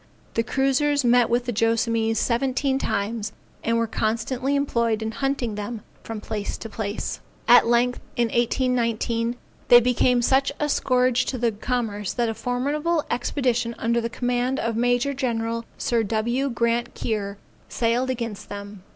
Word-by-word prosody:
The 230 - +2
cruisers 275 +3 +1
met 240 -1 +4
with 240 +1 +1
the 245 - -1
Joassamees 225 0 +1
seventeen 265 +3 +1
times 215 -1 -2 0.3
and 230 0 +1
were 230 - +2
constantly 230 +5 -1
employed 235 -6 +1
in 220 - -2
hunting 270 -2 -1
them 210 +1 -5 0.2
from 225 -1 -6
place 210 -1 -4
to - - -7
place. 215 -1 -4 0.3
At 245 -1 +7
length, 240 +1 +2 0.2
in 235 -1 +1
1819, 235 -1 0 0.3
they 240 - +9
became 245 0 +2
such 270 +3 +3
a 295 - 0
scourge 255 -2 +2
to 240 -3 0
commerce 210 -2 -2
that 240 -2 0
a - - -1
formidable 290 +8 -1
expedition 245 -2 0
under 235 +1 +1
the 230 - -2
command 245 +2 -1
of 230 -1 -1
Major 245 +4 +1
General 230 -3 -2
Sir 235 -1 +1
W. 235 +6 0
Grant 235 0 0
Keir, 205 -3 -3 0.3
sailed 240 +2 0
against 230 -5 -4
them. 200 -1 -8
235 Hz, 150 wpm, -24 LUFS, 225-255 Hz, 0.3 s, they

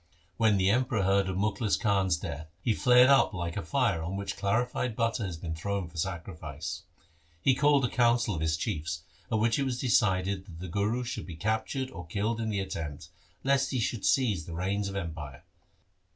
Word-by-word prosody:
When 110 -3 +4
the 95 +1 +3
Emperor 120 -3 +1
heard 95 0 +2
of 95 - -2
Mukhlis 105 +2 +1
Khan's 95 -5 +2
death, 80 -1 -6 0.2
he 115 - +2
flared 125 +3 +6
up 135 -6 +4
like 85 -1 -3
a 100 - -2
fire 95 - +1
on 85 +4 -3
which 100 0 -3
clarified 120 +3 0
butter 115 -1 0
has 90 -5 -4
been 80 0 -5
thrown 100 +2 -2
for 85 0 -13
sacrifice. 85 -1 -4 0.6
He 130 +9 +4
called 140 0 +4
a - - +2
council 120 -2 +2
of 80 - -3
his 80 0 +1
chiefs, 80 -5 -3 0.3
at - - +2
which 115 +3 +2
it - - +2
was 125 -2 -2
decided 100 -6 +1
that 85 -4 -11
the 95 - -6
Guru 105 +7 0
should 120 -8 -5
be 85 - -7
captured 110 - -1
or 90 -8 -8
killed 110 +6 -1
in 110 - -1
the 100 -2 0
attempt, 80 -4 -5 0.3
lest 135 0 +2
he 130 - -1
should 115 -1 -1
seize 105 - +2
the 85 - -6
reins 100 +3 -1
of 100 - -7
empire. 80 -8 -5
100 Hz, 200 wpm, -29 LUFS, 85-120 Hz, 0.6 s, flared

